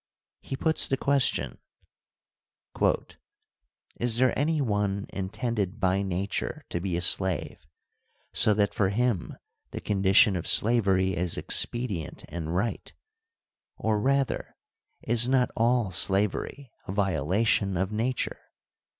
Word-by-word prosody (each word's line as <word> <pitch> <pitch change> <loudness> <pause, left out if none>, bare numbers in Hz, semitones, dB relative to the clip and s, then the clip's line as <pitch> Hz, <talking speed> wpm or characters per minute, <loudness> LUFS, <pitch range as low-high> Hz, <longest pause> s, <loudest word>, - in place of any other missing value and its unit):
He 135 - -5
puts 160 +3 +1
the 135 - 0
question: 140 -1 0 2.4
Is 120 -1 0
there 130 0 +2
any 155 +2 0
one 105 -5 -1
intended 105 +1 -3
by 95 0 +1
nature 95 +1 -3
to 85 - -2
be 90 -2 -2
a 85 - -1
slave, 95 -3 +2 0.7
so 105 - +3
that 100 -1 +1
for 95 -2 +1
him 115 -3 -1 0.3
the - - -6
condition 100 +1 +3
of 85 - -4
slavery 95 -5 +3
is 90 -1 -1
expedient 105 - -1
and 85 0 -5
right; 110 +6 -2 0.9
or, 110 -1 0
rather, 135 +2 -1 0.5
is 120 +1 +3
not 130 -2 +2
all 115 -3 +1
slavery 100 +8 0 0.2
a - - -4
violation 95 +2 0
of 95 +3 -1
nature 115 +4 -2
105 Hz, 115 wpm, -27 LUFS, 95-120 Hz, 2.4 s, so